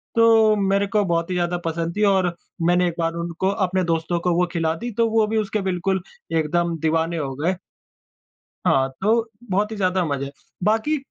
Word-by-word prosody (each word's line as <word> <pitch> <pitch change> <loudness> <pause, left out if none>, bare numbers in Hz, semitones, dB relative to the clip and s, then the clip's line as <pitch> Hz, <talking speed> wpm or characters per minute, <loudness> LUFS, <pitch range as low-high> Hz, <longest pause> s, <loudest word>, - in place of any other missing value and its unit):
तो 225 -2 +5
मेरे 200 0 +1
को 210 0 +1
बहुत 170 -1 0
ही - - -1
ज़्यादा 175 0 0
पसंद 165 +1 -2
थी 210 - +2
और 185 -3 +2 0.3
मैंने 175 +1 +3
एक 170 - -3
बार 165 0 0
उनको 170 +2 -2 0.2
अपने 185 +1 0
दोस्तों 165 0 0
को 175 0 +1
वो 180 +1 +3
खिला 165 -1 +1
दी, 240 +8 -5
तो 230 +2 +1
वो 220 -1 +3
भी 220 +1 -1
उसके 215 0 -1
बिल्कुल 190 0 -1 0.3
एकदम 165 +1 0
दीवाने 160 +2 0
हो 140 -3 -3
गए। 170 +6 0 1.1
हाँ, 135 0 +3
तो 225 +3 +2 0.2
बहुत 205 +3 +1
ही - - -4
ज़्यादा 185 -1 +1
मज़ा 140 -2 -2
है। 140 - -7 0.3
बाकी 225 +9 +2
180 Hz, 195 wpm, -22 LUFS, 165-205 Hz, 1.1 s, तो